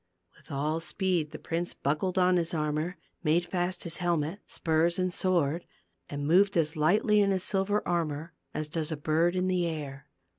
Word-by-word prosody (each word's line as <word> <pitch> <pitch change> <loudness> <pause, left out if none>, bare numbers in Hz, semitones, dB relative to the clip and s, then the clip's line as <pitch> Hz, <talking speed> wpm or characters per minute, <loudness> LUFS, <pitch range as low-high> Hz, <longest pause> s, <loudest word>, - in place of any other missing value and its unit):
With - - -21
all 150 +3 -1
speed 175 -2 0
the - - -8
prince 170 +1 -3
buckled 165 +7 -1
on 180 0 +4
his 170 0 0
ar 150 -1 0
mor, 165 +4 -2 0.2
made 170 +1 +2
fast 175 0 -2
his 170 -1 -3
helmet, 175 0 0
spurs 165 +1 +1
and 185 -1 0
sword, 170 -3 +1 0.5
and 145 0 -4
moved 195 +5 +4
as 160 0 +1
lightly 210 - +3
in 200 - +3
his 190 -2 +1
silver 200 +2 0
armor 165 -2 -1 0.2
as 155 0 -3
does 155 +1 -3
a 160 - -2
bird 160 +4 +1
in 185 0 +1
the 180 -2 +1
air. 145 -3 -5
170 Hz, 185 wpm, -29 LUFS, 155-185 Hz, 0.5 s, on